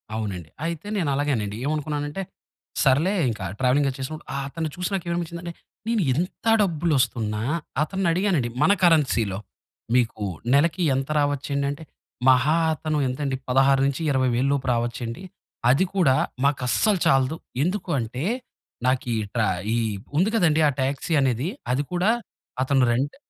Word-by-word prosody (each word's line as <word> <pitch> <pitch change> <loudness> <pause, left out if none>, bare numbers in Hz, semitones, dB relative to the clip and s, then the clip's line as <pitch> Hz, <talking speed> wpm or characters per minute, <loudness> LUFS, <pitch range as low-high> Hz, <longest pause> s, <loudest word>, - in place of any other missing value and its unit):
అవునండి. 95 -7 -4 0.2
అయితే 165 +2 -4
నేను 165 -7 0
అలాగేనండి. 120 -8 -1
ఏమనుకున్నానంటే 150 +2 -2 0.6
సర్లే 150 +8 +3 0.2
ఇంకా 105 -4 -4
ట్రావెలింగ్ 130 +2 +3
అది 130 - -6
చేసినప్పుడు 155 +5 -6
ఆహ్, 140 - -2
అతన్ని 160 +2 -3
చూసి 180 -1 -2
నాకేమనిపిచ్చిందంటే 170 -1 -3 0.3
నేను 230 -2 +1
ఎంత 175 - -3 0.2
డబ్బులస్తున్నా 135 - 0 0.4
అతన్ని 190 +4 -2
అడిగానండి 170 -8 +1
మన 185 - +5
కరెన్సీలో. 135 - +3 0.6
మీకు 115 -4 +1 0.3
నెలకి 165 +5 +3
ఎంత 135 +2 -2
రావచ్చండి 140 -1 0
అంటే 145 +3 -7 0.5
మహా 130 +4 +4 0.2
అతను 155 0 -2
ఎంతండి? 135 +1 -2
16-20000 135 -1 +2
లోపు 135 -2 -2
రావచ్చు 120 +1 -2
అండి. 115 +10 -6 0.5
అది 135 +9 +4
కూడా 155 -9 +4 0.3
మాకస్సలు 145 - +2
చాలదు. 135 +3 +3 0.3
ఎందుకు 185 +3 -2
అంటే 125 +3 -4 0.6
నాకు 130 0 +1
ఈ - - 0 0.2
ట్రా 110 -2 +2 0.3
ఈ - - +1 0.4
ఉంది 185 +6 +3
కదండీ. 160 -7 +3
ఆ - - +1
టాక్సీ 140 +5 -1
అనేది, 130 +2 +1 0.3
అది 140 +3 0
కూడా 180 +3 +2 0.5
అతను 135 0 +3
రెంట్ 135 +5 -1
140 Hz, 135 wpm, -24 LUFS, 130-165 Hz, 0.6 s, మన